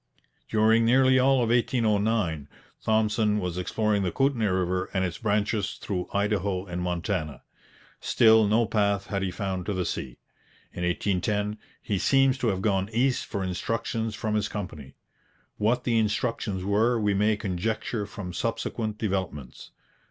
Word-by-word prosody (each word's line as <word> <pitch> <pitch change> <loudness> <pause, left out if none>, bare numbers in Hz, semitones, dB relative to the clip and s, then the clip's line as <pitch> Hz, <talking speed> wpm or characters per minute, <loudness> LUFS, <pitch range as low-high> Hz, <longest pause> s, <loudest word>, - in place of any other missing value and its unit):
During 110 +1 +4
nearly 130 +2 +4
all 130 -1 +4
of 115 - -1
1809 110 - +1 0.3
Thompson 110 -1 +2
was 90 -3 -3
exploring 105 +2 0
the 90 -2 -1
Kootenay 135 -5 +1
river 95 0 0
and 95 0 +2
its 90 - -5
branches 105 -1 0
through 90 -3 -4
Idaho 100 -2 0
and 90 -1 -5
Montana. 90 -3 -3 0.6
Still 110 -2 +5
no 115 +3 +3
path 100 -2 +1
had 100 -1 -3
he 95 - -1
found 95 -1 -4
to 105 - 0
the 90 -2 -1
sea. 65 -6 -4 0.6
In 90 - -5
1810 105 +4 -1 0.2
he 100 -3 -1
seems 135 +2 +3
to 125 - 0
have 95 -3 -1
gone 95 -2 +1
east 125 +3 +1
for 100 - -3
instructions 110 +4 -2
from 110 0 -2
his 105 -1 +1
company. 80 -11 -7 0.6
What 120 +4 +1
the 115 -2 +2
instructions 105 -3 -1
were 110 +5 +2
we 105 -2 +1
may 105 +2 +2
conjecture 105 +2 -2
from 95 -3 -7
subsequent 110 0 -3
developments. 95 - -4
105 Hz, 150 wpm, -26 LUFS, 95-110 Hz, 0.6 s, Still